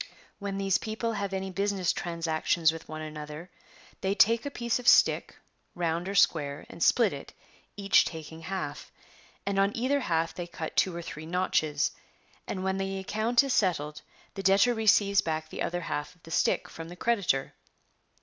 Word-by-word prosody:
When 200 Hz, -1 st, -4 dB
these 195 Hz, -1 st, +1 dB
people 225 Hz, +1 st, -3 dB
have 200 Hz, -2 st, -3 dB
any 190 Hz, 0 st, -3 dB
business 195 Hz, -1 st, 0 dB
transac 165 Hz, -2 st, -3 dB
tions 160 Hz, -2 st, +4 dB
with 165 Hz, 0 st, -10 dB
one 155 Hz, 0 st, -5 dB
another, 155 Hz, +3 st, -8 dB, 0.5 s
they 195 Hz, +1 st, 0 dB
take 230 Hz, +5 st, +4 dB
a -, -, -1 dB
piece 235 Hz, -3 st, -1 dB
of 250 Hz, -, -7 dB
stick, -, -, +5 dB, 0.4 s
round 170 Hz, +1 st, -1 dB
or 200 Hz, -, -4 dB
square, 145 Hz, -5 st, +2 dB
and 170 Hz, -, -11 dB
split 225 Hz, -2 st, +4 dB
it, 140 Hz, -, -9 dB, 0.4 s
each 200 Hz, -1 st, +5 dB
taking 160 Hz, -1 st, -7 dB
half 160 Hz, -5 st, -5 dB, 0.5 s
And 200 Hz, 0 st, 0 dB
on 195 Hz, +1 st, +3 dB
either 265 Hz, +4 st, +1 dB
half 165 Hz, -8 st, 0 dB
they 175 Hz, -1 st, -5 dB
cut 165 Hz, -2 st, -6 dB
two 185 Hz, -3 st, +2 dB
or 170 Hz, -, -5 dB
three 155 Hz, -1 st, -8 dB
notches. 155 Hz, -4 st, +1 dB, 0.6 s
And 185 Hz, -, -3 dB
when 190 Hz, 0 st, 0 dB
the 195 Hz, 0 st, -2 dB
account 220 Hz, +6 st, +2 dB
is 275 Hz, -2 st, -1 dB
settled 150 Hz, -, 0 dB, 0.3 s
the 195 Hz, -, -5 dB
debtor 195 Hz, +6 st, +4 dB
receives 205 Hz, -3 st, +4 dB
back 155 Hz, -1 st, -3 dB
the -, -, -6 dB
other 175 Hz, +1 st, -1 dB
half 150 Hz, -1 st, -4 dB
of 175 Hz, -, -31 dB
the 165 Hz, -, -12 dB
stick -, -, +1 dB
from 165 Hz, 0 st, -9 dB
the 175 Hz, -, -9 dB
creditor. 185 Hz, -, 0 dB
185 Hz, 180 wpm, -28 LUFS, 160-200 Hz, 0.6 s, stick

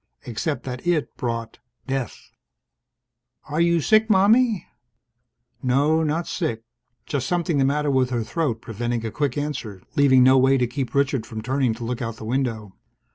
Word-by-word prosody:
Except 125 Hz, +3 st, -3 dB
that 125 Hz, +4 st, -6 dB
it 170 Hz, -4 st, 0 dB
brought 115 Hz, -2 st, -4 dB, 0.3 s
death... 135 Hz, -2 st, -4 dB, 1.1 s
"Are 155 Hz, +2 st, -2 dB
you 170 Hz, 0 st, +3 dB
sick, 215 Hz, +6 st, +3 dB
Mommie?" 215 Hz, +2 st, +4 dB, 1.0 s
No, 145 Hz, +5 st, +2 dB
not 160 Hz, +2 st, -1 dB
sick. 115 Hz, -11 st, -3 dB, 0.4 s
Just 135 Hz, -3 st, -2 dB
something 170 Hz, -3 st, 0 dB
the 135 Hz, -, +3 dB
matter 145 Hz, +1 st, +1 dB
with 130 Hz, -2 st, +2 dB
her 120 Hz, -3 st, -1 dB
throat, 125 Hz, -4 st, -2 dB
preventing 120 Hz, +1 st, -3 dB
a 110 Hz, -, -3 dB
quick 145 Hz, +1 st, -1 dB
answer, 125 Hz, -9 st, -4 dB, 0.2 s
leaving 130 Hz, -3 st, +5 dB
no 130 Hz, +1 st, +6 dB
way 135 Hz, +1 st, +4 dB
to 125 Hz, -, +2 dB
keep 130 Hz, +2 st, -4 dB
Richard 135 Hz, -4 st, +1 dB
from 110 Hz, -1 st, -6 dB
turning 130 Hz, -2 st, 0 dB
to 120 Hz, -, -8 dB
look 125 Hz, +2 st, -3 dB
out 115 Hz, -1 st, -3 dB
the 110 Hz, -, -9 dB
window. 115 Hz, -5 st, -2 dB
135 Hz, 165 wpm, -23 LUFS, 120-150 Hz, 1.1 s, no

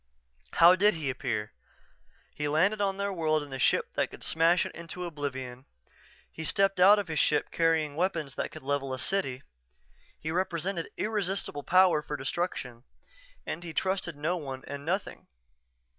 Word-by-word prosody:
_" -, -, -8 dB
How 170 Hz, +2 st, +8 dB
did 205 Hz, +2 st, +4 dB
he 150 Hz, -4 st, -2 dB
appear?... 110 Hz, -4 st, -3 dB, 0.8 s
He 150 Hz, -, -2 dB
landed 190 Hz, +8 st, +2 dB
on 195 Hz, -1 st, 0 dB
their 200 Hz, 0 st, -1 dB
world 155 Hz, -3 st, +1 dB
in 145 Hz, -2 st, -10 dB
a 130 Hz, -, -4 dB
ship -, -, +2 dB
that -, -, 0 dB
could -, -, -10 dB
smash 165 Hz, +2 st, +3 dB
it -, -, -7 dB
into 170 Hz, +1 st, -7 dB
oblivion; 130 Hz, -5 st, -5 dB, 0.7 s
he 160 Hz, -, -7 dB
stepped 195 Hz, +3 st, +1 dB
out 200 Hz, +3 st, +8 dB
of 205 Hz, -, -2 dB
his 160 Hz, -1 st, -1 dB
ship 150 Hz, -, +2 dB
carrying 160 Hz, -3 st, +1 dB
weapons 165 Hz, -5 st, -1 dB
that -, -, -3 dB
could -, -, -11 dB
level 135 Hz, -1 st, -1 dB
a -, -, -8 dB
city; 135 Hz, -6 st, -1 dB, 0.8 s
he 160 Hz, -, -4 dB
represented 175 Hz, 0 st, -2 dB
irresistible 195 Hz, -8 st, -1 dB
power 180 Hz, 0 st, +4 dB
for 150 Hz, 0 st, -5 dB
destruction 135 Hz, -4 st, -3 dB, 0.6 s
and 175 Hz, -, -4 dB
he 165 Hz, -2 st, -7 dB
trusted 190 Hz, -4 st, -1 dB
no 160 Hz, +5 st, -1 dB
one 135 Hz, -5 st, -6 dB
and 140 Hz, 0 st, -6 dB
nothing. 185 Hz, +6 st, -3 dB
165 Hz, 170 wpm, -29 LUFS, 145-185 Hz, 0.8 s, How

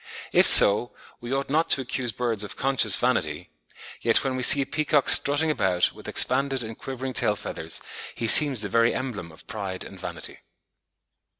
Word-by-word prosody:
If -, -, +3 dB
so, 105 Hz, +4 st, +7 dB, 0.2 s
we 120 Hz, +1 st, -10 dB
ought 135 Hz, 0 st, -5 dB
not 160 Hz, +3 st, -2 dB
to 135 Hz, -, 0 dB
accuse 125 Hz, -1 st, -4 dB
birds 115 Hz, -2 st, -4 dB
of 105 Hz, -, -9 dB
conscious 135 Hz, -1 st, +1 dB
vanity; -, -, -4 dB, 0.5 s
yet -, -, 0 dB
when 130 Hz, -1 st, -4 dB
we 130 Hz, -, -6 dB
see 140 Hz, +2 st, +4 dB
a -, -, -12 dB
peacock 145 Hz, 0 st, -2 dB
strutting 145 Hz, +3 st, +3 dB
about, 90 Hz, -10 st, -2 dB
with -, -, -15 dB
expanded 135 Hz, 0 st, +1 dB
and 110 Hz, 0 st, -10 dB
quivering 130 Hz, +1 st, -9 dB
tail 105 Hz, -, -1 dB
feathers, 80 Hz, -4 st, -7 dB, 0.3 s
he 115 Hz, -, -6 dB
seems 135 Hz, -1 st, +6 dB
the 105 Hz, -, -5 dB
very 115 Hz, +3 st, -1 dB
emblem 110 Hz, -10 st, -8 dB
of 80 Hz, -, -18 dB
pride 95 Hz, -3 st, -7 dB
and -, -, -14 dB
vanity. -, -, -7 dB
125 Hz, 180 wpm, -22 LUFS, 105-135 Hz, 0.5 s, so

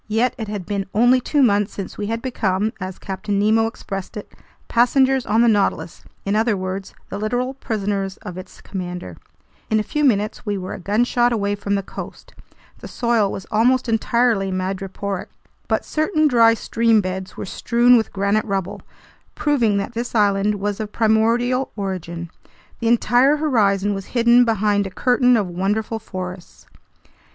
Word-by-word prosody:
Yet 225 Hz, +3 st, +1 dB
it 220 Hz, -, -4 dB
had 205 Hz, -3 st, -5 dB
been 195 Hz, 0 st, -3 dB
only 245 Hz, +3 st, +4 dB
two 285 Hz, +3 st, +2 dB
months 205 Hz, -4 st, +2 dB
since 195 Hz, -, -6 dB
we 205 Hz, -, -4 dB
had 230 Hz, +1 st, -3 dB
become, 215 Hz, -4 st, -1 dB
as 185 Hz, 0 st, -5 dB
Captain 200 Hz, +1 st, -3 dB
Nemo 220 Hz, +2 st, +3 dB
expressed 195 Hz, -3 st, -6 dB
it, 210 Hz, -, -8 dB, 0.4 s
"passengers 260 Hz, +2 st, +3 dB
on 220 Hz, +3 st, +3 dB
the -, -, +4 dB
Nautilus," 205 Hz, -6 st, 0 dB, 0.2 s
in 200 Hz, +1 st, 0 dB
other 220 Hz, -1 st, +2 dB
words, 185 Hz, +1 st, -5 dB
the 200 Hz, -, -5 dB
literal 245 Hz, +5 st, -1 dB
prisoners 200 Hz, -6 st, -3 dB
of 180 Hz, -5 st, -7 dB
its 185 Hz, 0 st, -11 dB
commander. 180 Hz, -, -6 dB, 0.5 s
In 220 Hz, -, +2 dB
a -, -, 0 dB
few 300 Hz, +7 st, -2 dB
minutes 215 Hz, -5 st, +1 dB
we 205 Hz, -3 st, -2 dB
were 185 Hz, 0 st, -5 dB
a -, -, -7 dB
gunshot 240 Hz, +5 st, +1 dB
away 205 Hz, -3 st, 0 dB
from 200 Hz, 0 st, -2 dB
the 195 Hz, -, -1 dB
coast. -, -, -9 dB, 0.5 s
The -, -, -9 dB
soil 235 Hz, -4 st, +1 dB
was 190 Hz, -, -6 dB
almost 245 Hz, +4 st, +2 dB
entirely 225 Hz, -3 st, +1 dB
madreporic, 190 Hz, +1 st, -4 dB, 0.4 s
but -, -, 0 dB
certain 310 Hz, 0 st, +1 dB
dry 230 Hz, -4 st, +5 dB
stream 230 Hz, 0 st, +2 dB
beds 185 Hz, -1 st, -4 dB
were -, -, -5 dB
strewn 240 Hz, +5 st, +3 dB
with 225 Hz, -2 st, +1 dB
granite 200 Hz, +2 st, 0 dB
rubble, 195 Hz, -3 st, -3 dB, 0.5 s
proving 240 Hz, -9 st, +1 dB
that 200 Hz, +4 st, -3 dB
this 240 Hz, +1 st, -4 dB
island 205 Hz, -1 st, +2 dB
was 205 Hz, +1 st, -3 dB
of 215 Hz, -1 st, -4 dB
primordial 230 Hz, +4 st, +1 dB
origin. 175 Hz, -4 st, -5 dB, 0.5 s
The 230 Hz, -, -1 dB
entire 245 Hz, +5 st, +4 dB
horizon 205 Hz, -9 st, +1 dB
was 195 Hz, -1 st, -6 dB
hidden 240 Hz, +1 st, +5 dB
behind 205 Hz, -3 st, +1 dB
a -, -, -6 dB
curtain 250 Hz, +4 st, +3 dB
of 205 Hz, -4 st, 0 dB
wonderful 205 Hz, +5 st, -2 dB
forests. 185 Hz, -3 st, -8 dB
210 Hz, 165 wpm, -21 LUFS, 195-235 Hz, 0.5 s, dry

